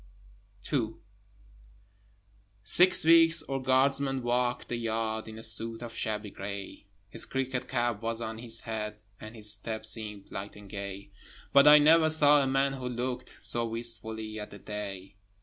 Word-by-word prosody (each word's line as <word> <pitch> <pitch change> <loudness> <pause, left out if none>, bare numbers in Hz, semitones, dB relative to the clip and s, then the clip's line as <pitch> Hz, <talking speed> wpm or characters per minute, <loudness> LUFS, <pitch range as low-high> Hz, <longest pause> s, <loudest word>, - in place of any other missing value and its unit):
II - - 0 1.7
Six 180 -2 +4
weeks 165 0 +6
our 135 -1 -3
guardsman 135 0 +1
walked 120 0 -1
the 120 - -2
yard, 110 -1 -2
In 110 0 -9
a 110 - -6
suit 115 +1 -1
of 115 -1 -8
shabby 105 -2 -3
grey: 100 +1 -7 0.2
His - - -6
cricket 130 -1 -3
cap 120 -4 -1
was 115 0 -2
on 110 -1 -5
his 115 -1 +2
head, 105 -1 -5 0.2
And 110 +2 -10
his 105 -1 +2
step 110 +1 -5
seemed 105 -2 -2
light 100 +1 -7
and 105 -1 -13
gay, 100 0 -7 0.4
But 140 +1 +7
I 150 0 +10
never 160 +2 +5
saw 150 -2 +6
a 135 - 0
man 135 +1 +1
who 130 -2 -5
looked 125 +1 -5
So 120 - +2
wistfully 110 -1 -3
at 105 - -7
the 100 - -11
day. 100 -1 -7
115 Hz, 160 wpm, -29 LUFS, 105-130 Hz, 1.7 s, I